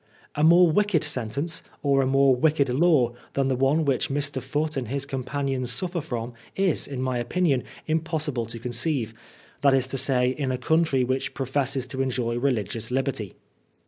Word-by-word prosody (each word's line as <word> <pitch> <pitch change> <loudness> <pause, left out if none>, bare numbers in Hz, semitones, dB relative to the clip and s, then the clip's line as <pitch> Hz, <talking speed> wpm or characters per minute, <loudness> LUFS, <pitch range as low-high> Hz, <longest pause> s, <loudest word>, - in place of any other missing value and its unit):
A 150 - -1
more 170 +1 +6
wicked 205 -2 +2
sentence, 140 +3 -2 0.2
or 140 -1 +3
a 130 - +1
more 135 0 +4
wicked 145 0 +2
law, 130 -3 +3 0.2
than 135 -1 +1
tne 130 - 0
one 145 +4 +2
which 135 -3 0
Mr. 140 -1 -1
Foote 150 +4 -2
and 130 -4 -3
his 140 +3 -2
companions 135 -1 -3
suffer 175 +6 -2
from, 120 -5 -5 0.2
is, 190 -5 +1
in 130 -2 -4
my 130 -2 -1
opinion, 135 +1 +1 0.2
impossible 155 -6 -1
to 115 - -6
conceive, 120 0 -1 0.5
that 140 -1 +5
IS 130 -1 +1
to 130 +1 -2
say 125 -2 +3
in 135 -1 -2
a 130 - -1
country 155 0 +2
which 130 +1 -2
professes 135 0 -1
to 130 +1 -4
enjoy 120 -2 -1
religious 115 -4 -1
liberty. 130 -6 -2
135 Hz, 175 wpm, -25 LUFS, 125-150 Hz, 0.5 s, more